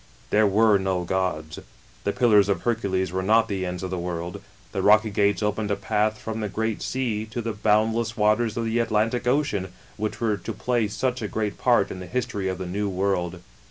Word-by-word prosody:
There 105 Hz, 0 st, +4 dB
were 105 Hz, +1 st, +4 dB
no 95 Hz, -2 st, -1 dB
gods. 85 Hz, -4 st, -2 dB, 0.5 s
The 100 Hz, -, +2 dB
Pillars 105 Hz, -4 st, +4 dB
of 100 Hz, -, 0 dB
Hercules 95 Hz, -6 st, 0 dB
were 95 Hz, +1 st, -1 dB
not 110 Hz, +4 st, +3 dB
the 95 Hz, -2 st, -2 dB
ends 90 Hz, 0 st, -5 dB
of 95 Hz, -, -4 dB
the 90 Hz, -, -2 dB
world. 85 Hz, +2 st, -4 dB, 0.3 s
The 95 Hz, -, -2 dB
rocky 110 Hz, +2 st, +5 dB
gates 100 Hz, +1 st, +2 dB
opened 105 Hz, 0 st, -1 dB
a 100 Hz, -, +1 dB
path 105 Hz, +1 st, 0 dB
from 110 Hz, 0 st, -5 dB
the 105 Hz, -1 st, -2 dB
Great 110 Hz, +2 st, -2 dB
Sea, 120 Hz, -5 st, -1 dB
to 110 Hz, +2 st, -5 dB
the 115 Hz, -1 st, -2 dB
bound 105 Hz, +2 st, +2 dB
less 115 Hz, 0 st, -2 dB
waters 110 Hz, +1 st, +2 dB
of 115 Hz, -, -1 dB
the 115 Hz, +1 st, 0 dB
Atlantic 115 Hz, +2 st, 0 dB
Ocean, 125 Hz, -9 st, 0 dB, 0.3 s
which 110 Hz, 0 st, -3 dB
were 110 Hz, -3 st, +1 dB
to 100 Hz, +5 st, -6 dB
play 120 Hz, +1 st, 0 dB
such 125 Hz, +4 st, -2 dB
a 105 Hz, -, -2 dB
great 105 Hz, -1 st, -3 dB
part 120 Hz, -6 st, +3 dB
in 95 Hz, -, -6 dB
the 90 Hz, -, -8 dB
history 105 Hz, -6 st, -2 dB
of 95 Hz, -1 st, -2 dB
the 95 Hz, -, -5 dB
New 100 Hz, +3 st, -2 dB
World. 90 Hz, -2 st, -1 dB
105 Hz, 215 wpm, -25 LUFS, 95-110 Hz, 0.5 s, rocky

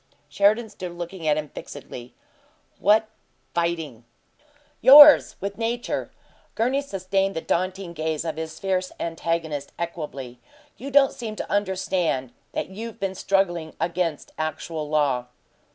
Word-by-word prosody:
Sheridan 205 Hz, +8 st, +3 dB
stood 185 Hz, -4 st, -7 dB
looking 175 Hz, -1 st, -6 dB
at 150 Hz, 0 st, +3 dB
him 150 Hz, -1 st, -4 dB
fixedly. 125 Hz, -4 st, -10 dB, 0.6 s
"What 215 Hz, +2 st, +4 dB, 0.5 s
'fighting?'" 165 Hz, -8 st, -2 dB, 0.8 s
"Yours 290 Hz, +2 st, +9 dB
with 200 Hz, +3 st, -5 dB
nature." 235 Hz, +1 st, -2 dB, 0.5 s
Gurney 255 Hz, +5 st, +1 dB
sustained 195 Hz, -5 st, -1 dB
the -, -, -1 dB
daunting 185 Hz, +1 st, -2 dB
gaze 160 Hz, 0 st, -2 dB
of 160 Hz, -2 st, -2 dB
his 160 Hz, 0 st, -5 dB
fierce 185 Hz, -1 st, -1 dB
antagonist 165 Hz, -3 st, -3 dB
equably. 150 Hz, -7 st, -6 dB, 0.4 s
"You 270 Hz, +4 st, -7 dB
don't 275 Hz, -1 st, +5 dB
seem 220 Hz, -3 st, -6 dB
to -, -, -6 dB
understand 185 Hz, -9 st, 0 dB, 0.2 s
that -, -, -3 dB
you've 220 Hz, +4 st, -8 dB
been 195 Hz, -1 st, -2 dB
struggling 175 Hz, -4 st, 0 dB
against 170 Hz, -3 st, -2 dB
actual 155 Hz, -1 st, -4 dB
law." 140 Hz, -5 st, +1 dB
175 Hz, 125 wpm, -24 LUFS, 155-200 Hz, 0.8 s, Yours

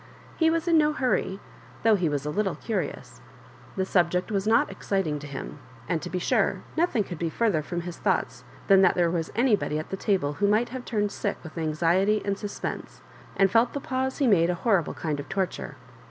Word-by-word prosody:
He 325 Hz, -1 st, +3 dB
was 330 Hz, +1 st, 0 dB
in 330 Hz, -2 st, +5 dB
no 300 Hz, 0 st, +3 dB
hurry, 250 Hz, -8 st, 0 dB, 0.4 s
though 225 Hz, 0 st, +5 dB
he 180 Hz, -6 st, +2 dB
was 145 Hz, -1 st, -2 dB
a 150 Hz, -, -2 dB
little 195 Hz, -1 st, 0 dB
curioua 220 Hz, +8 st, -4 dB, 0.6 s
The 190 Hz, -, 0 dB
subject 180 Hz, +1 st, +1 dB
was 200 Hz, 0 st, -1 dB
not 225 Hz, -1 st, +3 dB
exciting 190 Hz, -6 st, -1 dB
to 145 Hz, -, -8 dB
him; 140 Hz, -1 st, -7 dB, 0.3 s
and 165 Hz, -3 st, -1 dB
to 180 Hz, -, -6 dB
be 185 Hz, -, -3 dB
sure 180 Hz, -, +1 dB
nothing 325 Hz, -10 st, +2 dB
could 175 Hz, -4 st, -8 dB
be 170 Hz, -, -1 dB
further 200 Hz, -3 st, +1 dB
from 175 Hz, +3 st, -4 dB
his 175 Hz, 0 st, -7 dB
thoughts 125 Hz, -1 st, -1 dB, 0.2 s
than 195 Hz, -1 st, +6 dB
that 185 Hz, -, +4 dB
tbefe 175 Hz, -2 st, +2 dB
was 165 Hz, -2 st, -2 dB
anybody 225 Hz, -, +2 dB
at 155 Hz, -, -6 dB
the 195 Hz, -, -2 dB
table 185 Hz, -8 st, 0 dB
who 200 Hz, +7 st, +1 dB
m^ht 215 Hz, +4 st, +2 dB
have 255 Hz, 0 st, -7 dB
turned 205 Hz, -2 st, -1 dB
sick 205 Hz, -, -2 dB
with 160 Hz, -, -10 dB
anxiety 170 Hz, +6 st, +2 dB
and 200 Hz, -1 st, -1 dB
suspense, 205 Hz, -, -6 dB, 0.4 s
and 195 Hz, -1 st, +4 dB
felt 230 Hz, +3 st, +3 dB
the 285 Hz, -, -2 dB
pause 265 Hz, -1 st, -2 dB
be 280 Hz, -, +2 dB
made 180 Hz, -8 st, +4 dB
a 180 Hz, -, +1 dB
horrible 190 Hz, -3 st, +1 dB
kind 150 Hz, -3 st, -3 dB
of 145 Hz, -, -7 dB
torture. 190 Hz, -2 st, -3 dB
195 Hz, 210 wpm, -26 LUFS, 170-220 Hz, 0.6 s, than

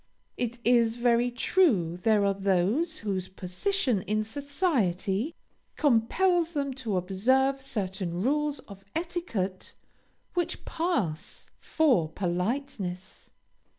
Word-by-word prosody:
It 240 Hz, -1 st, -2 dB
is 235 Hz, -1 st, +4 dB
very 240 Hz, 0 st, +3 dB
true 240 Hz, -, +2 dB
there 215 Hz, -1 st, +3 dB
are 200 Hz, -, +3 dB
those 200 Hz, -, +1 dB
whose 190 Hz, -3 st, -1 dB
position 200 Hz, -, -1 dB
in 215 Hz, +3 st, 0 dB
society 250 Hz, -, -1 dB, 0.4 s
compels 330 Hz, +7 st, +2 dB
them 280 Hz, -3 st, -1 dB
to 235 Hz, -7 st, -2 dB
observe 260 Hz, +9 st, +2 dB
certain 190 Hz, -8 st, -3 dB
rules 295 Hz, +3 st, +1 dB
of 195 Hz, -1 st, -13 dB
etiquette 320 Hz, -, -3 dB, 0.6 s
which 350 Hz, 0 st, -2 dB
pass 210 Hz, -, -2 dB
for 255 Hz, -, +2 dB
politeness. 185 Hz, -, -3 dB
230 Hz, 100 wpm, -28 LUFS, 190-285 Hz, 0.6 s, is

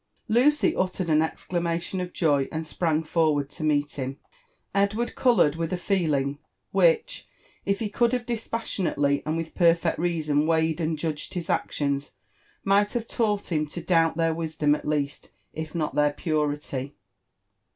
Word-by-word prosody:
Lucy 260 Hz, +7 st, +3 dB
uttered 185 Hz, -2 st, -1 dB
an 155 Hz, 0 st, +5 dB
exclamation 170 Hz, +2 st, -2 dB
of 180 Hz, 0 st, -5 dB
joy, 145 Hz, -6 st, +2 dB
and 160 Hz, 0 st, -3 dB
sprang 160 Hz, 0 st, 0 dB
forward 155 Hz, -3 st, +1 dB
to -, -, -7 dB
meet 145 Hz, -1 st, +1 dB
him. 135 Hz, 0 st, -4 dB, 0.6 s
Edward 200 Hz, +4 st, +1 dB
coloured 195 Hz, -, +3 dB
with 165 Hz, -1 st, -3 dB
a 180 Hz, -, 0 dB
feeling 150 Hz, -7 st, 0 dB, 0.3 s
which, -, -, +2 dB, 0.4 s
if 200 Hz, 0 st, +2 dB
he 220 Hz, -, -1 dB
could 230 Hz, +3 st, +1 dB
have 250 Hz, -1 st, -1 dB
dispassionaleW 195 Hz, -11 st, -1 dB
and 155 Hz, +1 st, 0 dB
wilh 165 Hz, -1 st, -4 dB
perfect 170 Hz, -2 st, +3 dB
reason 155 Hz, -3 st, +1 dB
weighed 160 Hz, 0 st, +1 dB
and 160 Hz, 0 st, 0 dB
judged 155 Hz, +1 st, -4 dB
his 175 Hz, -2 st, -2 dB
actions, 140 Hz, -1 st, -1 dB, 0.5 s
might 200 Hz, +2 st, +3 dB
have 235 Hz, -2 st, -2 dB
taught 210 Hz, -4 st, -1 dB
him 155 Hz, -2 st, +1 dB
to 155 Hz, -, -6 dB
doubt 165 Hz, -1 st, +2 dB
their 165 Hz, -1 st, +2 dB
wisdom 155 Hz, -2 st, 0 dB
at 150 Hz, -, -3 dB
least, 145 Hz, -2 st, -2 dB, 0.2 s
if 160 Hz, +1 st, -6 dB
not 155 Hz, -3 st, -1 dB
(heir 150 Hz, 0 st, +3 dB
purity. 145 Hz, -3 st, -2 dB
165 Hz, 155 wpm, -26 LUFS, 150-190 Hz, 0.6 s, an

